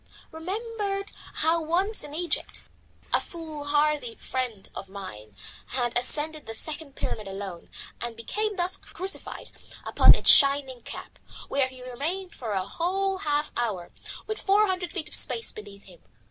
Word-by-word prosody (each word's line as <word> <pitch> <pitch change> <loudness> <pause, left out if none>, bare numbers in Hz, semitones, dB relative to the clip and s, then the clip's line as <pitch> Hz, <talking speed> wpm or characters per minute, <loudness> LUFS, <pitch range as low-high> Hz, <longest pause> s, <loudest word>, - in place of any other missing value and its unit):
Remembered 395 +3 -3 0.3
how 330 +1 +4
once 365 +7 0
in 295 0 -8
Egypt 345 +1 0 0.5
a - - +4
foolhardy 295 -5 -1
friend 245 -6 -3
of 195 - -7
mine 110 - -9 0.3
had 245 -2 -1
ascended 300 +5 +3
the 225 - -4
Second 300 +2 -3
Pyramid 215 -2 -3
alone, 195 -3 -6 0.3
and 235 -1 -4
become 420 - -1
thus 360 0 +1
crucified 380 +2 -3 0.3
upon - - +7
its - - +7
shining 275 -3 +6
cap, - - -8 0.3
where 275 -1 +3
he 260 -1 -10
remained 335 +9 -3
for 225 -4 -4
a 190 -1 0
whole 380 +2 0
half 295 -3 0
hour 205 -8 -2 0.3
with 435 0 -4
four 405 +2 +5
hundred 365 -3 -2
feet 315 -5 -2
of - - -10
space 235 -3 +3
beneath 205 -1 -11
him. 180 -3 -16
295 Hz, 145 wpm, -27 LUFS, 230-360 Hz, 0.5 s, upon